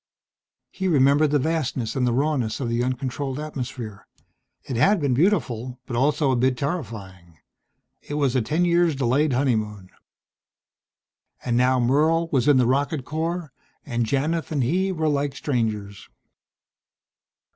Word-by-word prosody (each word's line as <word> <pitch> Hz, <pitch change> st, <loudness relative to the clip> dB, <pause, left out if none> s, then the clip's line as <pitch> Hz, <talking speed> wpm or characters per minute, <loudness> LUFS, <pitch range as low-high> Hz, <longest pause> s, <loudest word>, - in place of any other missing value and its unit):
He 190 Hz, -, -3 dB
remembered 145 Hz, -1 st, +4 dB
the 145 Hz, -, +3 dB
vastness 135 Hz, -6 st, -2 dB
and 125 Hz, -2 st, +1 dB
the -, -, +2 dB
rawness 130 Hz, -4 st, 0 dB
of 130 Hz, -, -2 dB
the 120 Hz, +1 st, 0 dB
uncontrolled 130 Hz, +2 st, -3 dB
atmosphere. 125 Hz, -8 st, -6 dB, 0.6 s
It 130 Hz, -, -5 dB
had 195 Hz, -, +3 dB
been 140 Hz, -4 st, +1 dB
beautiful 130 Hz, -, 0 dB
but 120 Hz, -, -5 dB
also 140 Hz, +2 st, +2 dB
a -, -, +2 dB
bit 125 Hz, +1 st, +1 dB
terrifying. 100 Hz, -, -5 dB, 0.6 s
It 145 Hz, -, -6 dB
was 140 Hz, -3 st, +1 dB
a 130 Hz, -, +3 dB
ten 155 Hz, +10 st, 0 dB
years 170 Hz, -2 st, +3 dB
delayed 135 Hz, +3 st, +1 dB
honeymoon.... 110 Hz, -7 st, -1 dB, 1.5 s
And 120 Hz, -2 st, 0 dB
now 125 Hz, +1 st, +3 dB
Merle 155 Hz, +7 st, +2 dB
was 130 Hz, -3 st, +1 dB
in 145 Hz, -2 st, +6 dB
the 125 Hz, -, +4 dB
rocket 135 Hz, +2 st, 0 dB
corps 160 Hz, -1 st, -3 dB, 0.3 s
and 120 Hz, -4 st, -1 dB
Janith 155 Hz, +7 st, -1 dB
and 145 Hz, -4 st, 0 dB
he 185 Hz, +9 st, +1 dB
were 160 Hz, -3 st, -1 dB
like 145 Hz, -2 st, 0 dB
strangers. 110 Hz, -8 st, -3 dB
135 Hz, 145 wpm, -24 LUFS, 120-150 Hz, 1.5 s, in